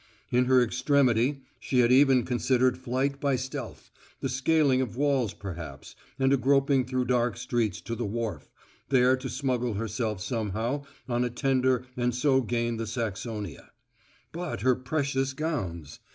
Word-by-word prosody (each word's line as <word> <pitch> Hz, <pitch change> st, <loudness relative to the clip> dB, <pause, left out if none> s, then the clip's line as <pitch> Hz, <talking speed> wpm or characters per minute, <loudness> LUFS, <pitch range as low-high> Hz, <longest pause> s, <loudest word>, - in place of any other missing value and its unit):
In 125 Hz, +1 st, +3 dB
her 130 Hz, -1 st, +5 dB
extremity 135 Hz, +1 st, +2 dB, 0.2 s
she 125 Hz, -2 st, +2 dB
had 120 Hz, 0 st, +3 dB
even 130 Hz, -1 st, +5 dB
considered 125 Hz, +1 st, +2 dB
flight 130 Hz, +2 st, -2 dB
by 140 Hz, -2 st, +2 dB
stealth 130 Hz, -1 st, -6 dB, 0.3 s
the 135 Hz, -, -2 dB
scaling 130 Hz, 0 st, +2 dB
of 120 Hz, -2 st, -4 dB
walls 135 Hz, -6 st, +1 dB
perhaps, 85 Hz, -9 st, -8 dB, 0.2 s
and 135 Hz, 0 st, +3 dB
a -, -, +4 dB
groping 135 Hz, 0 st, +3 dB
through 130 Hz, 0 st, -1 dB
dark 120 Hz, -2 st, +1 dB
streets 115 Hz, -6 st, -1 dB
to 115 Hz, -, -5 dB
the 120 Hz, -, -3 dB
wharf, 105 Hz, -7 st, -4 dB, 0.4 s
there 130 Hz, -1 st, +4 dB
to 130 Hz, 0 st, -6 dB
smuggle 125 Hz, -2 st, -1 dB
herself 110 Hz, -1 st, -2 dB
somehow 115 Hz, +6 st, -2 dB, 0.2 s
on 120 Hz, -1 st, 0 dB
a 125 Hz, -, 0 dB
tender 130 Hz, 0 st, +1 dB
and 125 Hz, -1 st, 0 dB
so 130 Hz, +1 st, +3 dB
gain 120 Hz, 0 st, -1 dB
the 115 Hz, 0 st, -4 dB
Saxonia. 110 Hz, -1 st, -4 dB, 0.6 s
But 175 Hz, 0 st, -5 dB
her 130 Hz, 0 st, +4 dB
precious 135 Hz, +1 st, -1 dB
gowns! 95 Hz, -, -4 dB
125 Hz, 150 wpm, -27 LUFS, 115-135 Hz, 0.6 s, her